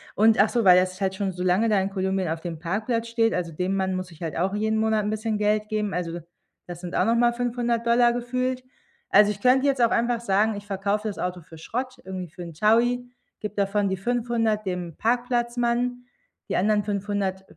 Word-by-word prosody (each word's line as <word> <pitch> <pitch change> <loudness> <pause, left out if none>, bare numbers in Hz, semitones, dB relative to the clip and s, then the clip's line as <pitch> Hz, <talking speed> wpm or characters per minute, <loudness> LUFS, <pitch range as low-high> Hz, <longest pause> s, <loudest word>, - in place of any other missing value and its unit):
Und 220 0 +4
ach 210 - +5
so, 235 -2 0
weil 180 -1 +7
das 185 +1 -2
halt 190 0 0
schon 195 -1 -2
so 180 0 -4
lange 185 +5 +2
da 210 -2 +3
in 195 - -1
Kolumbien 190 -2 -1
auf 160 0 -2
dem 170 -2 -5
Parkplatz 220 +7 -2
steht, 230 -1 +2
also, 175 -2 -2
dem 180 +4 -2
Mann 190 -1 0
muss 185 -1 -5
ich 165 - -16
halt 160 -4 -4
auch 185 +4 0
jeden 220 +1 0
Monat 220 -1 +1
'n 205 - -1
bisschen 215 0 -2
Geld 210 0 +1
geben, 210 -2 -1
also, 170 -1 -3 0.5
das 175 -1 -8
sind 180 -1 -6
auch - - +2
noch 230 - +3
mal 240 0 +3
500 240 -1 -1
Dollar 240 0 +4
gefühlt. 255 +1 -2 0.5
Also, 205 +1 +6
ich 205 -1 -8
könnte 260 +2 +4
jetzt 275 -3 +1
auch 230 - +3
einfach 235 0 +1
sagen: 215 0 +2
„Ich 205 0 -8
verkaufe 200 +2 -1
das 205 - -5
Auto 180 0 -3
für 160 0 -14
Schrott, 255 +10 -4
irgendwie 185 -2 -6
für 175 +3 -9
'n 170 - -8
1.000er 240 +7 +2 0.3
gebe 210 -1 -5
davon 200 0 +1
die 190 - -1
500 225 0 0
dem 180 -3 -4
Parkplatzmann, 240 +1 0 0.4
die - - -1
anderen 210 +2 +2
500 200 -2 -2
210 Hz, 220 wpm, -25 LUFS, 190-235 Hz, 0.5 s, weil